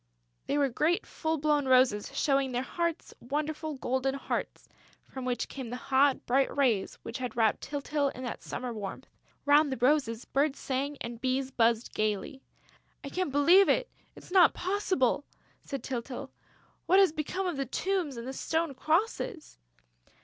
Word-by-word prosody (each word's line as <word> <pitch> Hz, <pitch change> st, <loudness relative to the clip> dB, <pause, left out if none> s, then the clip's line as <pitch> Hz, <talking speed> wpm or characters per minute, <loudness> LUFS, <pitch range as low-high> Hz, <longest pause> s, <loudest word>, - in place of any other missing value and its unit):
They 285 Hz, -, 0 dB
were 285 Hz, -1 st, +3 dB
great 315 Hz, -, +1 dB
full 320 Hz, 0 st, -2 dB
blown 295 Hz, -2 st, +1 dB
roses, 255 Hz, -5 st, +4 dB
showing 275 Hz, -2 st, +2 dB
their 250 Hz, +1 st, -1 dB
hearts, 335 Hz, +3 st, -3 dB
wonderful 305 Hz, +3 st, -3 dB
golden 260 Hz, +1 st, -1 dB
hearts 275 Hz, -, -4 dB, 0.4 s
from 260 Hz, -1 st, -8 dB
which 250 Hz, -1 st, -1 dB
came 260 Hz, -4 st, -7 dB
the 245 Hz, -, -4 dB
hot, 270 Hz, +2 st, +2 dB
bright 270 Hz, +3 st, +1 dB
rays 235 Hz, -9 st, +2 dB
which 230 Hz, +3 st, -6 dB
had 250 Hz, -3 st, -5 dB
wrapped 220 Hz, -2 st, +2 dB
Tyltyl 285 Hz, 0 st, -1 dB
in 255 Hz, -, -7 dB
that 245 Hz, -, -5 dB
summer 250 Hz, -1 st, -5 dB
warmth. 205 Hz, -3 st, -6 dB, 0.4 s
Round 290 Hz, 0 st, +5 dB
the 265 Hz, -, -2 dB
roses, 250 Hz, -2 st, +1 dB
birds 280 Hz, +1 st, +1 dB
sang 280 Hz, +2 st, -2 dB
and 235 Hz, 0 st, -6 dB
bees 260 Hz, +1 st, 0 dB
buzzed 230 Hz, -2 st, +1 dB
gaily. 215 Hz, +5 st, -2 dB, 0.6 s
"I 280 Hz, -, -5 dB
can't 365 Hz, -1 st, -2 dB
believe 340 Hz, +8 st, +6 dB
it! -, -, +1 dB, 0.2 s
It's -, -, -14 dB
not 365 Hz, -3 st, +6 dB
possible!" 365 Hz, -, 0 dB, 0.4 s
said 275 Hz, -, -6 dB
Tyltyl. 260 Hz, +1 st, -5 dB, 0.6 s
"What 375 Hz, -, +5 dB
has 390 Hz, -4 st, +6 dB
become 320 Hz, +5 st, -3 dB
of 350 Hz, -5 st, -2 dB
the 275 Hz, -1 st, -2 dB
tombs 355 Hz, -2 st, -1 dB
and 235 Hz, +1 st, -6 dB
the 265 Hz, -, -4 dB
stone 320 Hz, +2 st, -1 dB
crosses?" 340 Hz, -, -1 dB
275 Hz, 165 wpm, -29 LUFS, 255-310 Hz, 0.6 s, believe